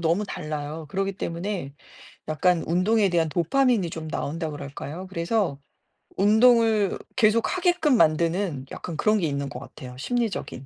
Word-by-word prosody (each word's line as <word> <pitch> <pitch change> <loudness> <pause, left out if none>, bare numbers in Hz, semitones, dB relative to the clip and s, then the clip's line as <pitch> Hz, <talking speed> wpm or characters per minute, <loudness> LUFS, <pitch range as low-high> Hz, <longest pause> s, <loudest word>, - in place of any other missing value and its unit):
너무 170 +5 +1
달라요. 150 0 -5
그러기 195 +4 -1
때문에 170 -4 -4 0.6
약간 165 +3 +2
운동에 195 +4 +2
대한 165 -2 +1
도파민이 195 - +2
좀 160 -1 -6
나온다 160 +1 -3
그럴까요? 145 +4 -7
그래서 170 -4 -1 0.6
운동을 220 0 +4 0.2
계속 225 +5 +3
하게끔 350 -7 +3
만드는 165 - +1
약간 170 - -6
그런 215 +4 +3
게 170 - 0
있는 140 -1 -3
것 125 - -7
같아요, 125 -1 -11
심리적인. 225 - -3
175 Hz, 330 characters per minute, -25 LUFS, 155-215 Hz, 0.6 s, 운동을